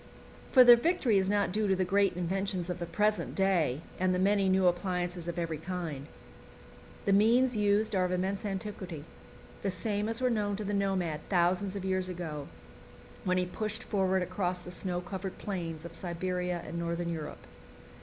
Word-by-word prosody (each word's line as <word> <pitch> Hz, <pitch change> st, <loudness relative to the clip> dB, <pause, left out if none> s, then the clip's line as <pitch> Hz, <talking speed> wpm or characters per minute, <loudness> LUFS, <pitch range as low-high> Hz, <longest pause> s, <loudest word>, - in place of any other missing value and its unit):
For 255 Hz, -, +9 dB
the 245 Hz, -1 st, +10 dB
victory 240 Hz, -, +2 dB
is 190 Hz, 0 st, 0 dB
not 205 Hz, -2 st, +2 dB
due 210 Hz, +2 st, 0 dB
to 190 Hz, -, +3 dB
the 185 Hz, 0 st, 0 dB
great 195 Hz, 0 st, +2 dB
inventions 185 Hz, 0 st, -2 dB
of 180 Hz, -, -5 dB
the 170 Hz, -, -4 dB
present 210 Hz, +3 st, 0 dB
day 175 Hz, -8 st, +2 dB, 0.2 s
and 185 Hz, 0 st, +2 dB
the -, -, +1 dB
many 195 Hz, +1 st, +3 dB
new 190 Hz, 0 st, +3 dB
appliances 175 Hz, -1 st, 0 dB
of 170 Hz, -, -4 dB
every 165 Hz, -3 st, -2 dB
kind. 165 Hz, -5 st, -5 dB, 1.0 s
The 200 Hz, -, +3 dB
means 235 Hz, +5 st, +4 dB
used 210 Hz, +1 st, +2 dB
are 185 Hz, -2 st, +2 dB
of 180 Hz, -, 0 dB
immense 190 Hz, +2 st, -1 dB
antiquity, 190 Hz, -6 st, -5 dB, 0.6 s
the 200 Hz, -, 0 dB
same 205 Hz, +3 st, -1 dB
as 225 Hz, -, +1 dB
were 255 Hz, -1 st, +2 dB
known 205 Hz, -3 st, 0 dB
to 210 Hz, -, -4 dB
the 205 Hz, 0 st, -2 dB
nomad 190 Hz, -6 st, 0 dB
thousands 185 Hz, +2 st, +2 dB
of 195 Hz, -1 st, -4 dB
years 185 Hz, -1 st, 0 dB
ago, 160 Hz, -5 st, -5 dB, 0.8 s
when 185 Hz, 0 st, +2 dB
he 180 Hz, -, +2 dB
pushed 215 Hz, +4 st, -3 dB
forward 190 Hz, -2 st, +1 dB
across 180 Hz, 0 st, -1 dB
the 180 Hz, 0 st, -10 dB
snow 180 Hz, -1 st, -3 dB
covered 190 Hz, +1 st, -6 dB
plains 170 Hz, -5 st, -4 dB
of 170 Hz, -, -8 dB
Siberia 180 Hz, 0 st, -3 dB
and 170 Hz, +2 st, -5 dB
Northern 170 Hz, 0 st, -2 dB
Europe. 155 Hz, -3 st, -6 dB
185 Hz, 185 wpm, -30 LUFS, 175-200 Hz, 1.0 s, the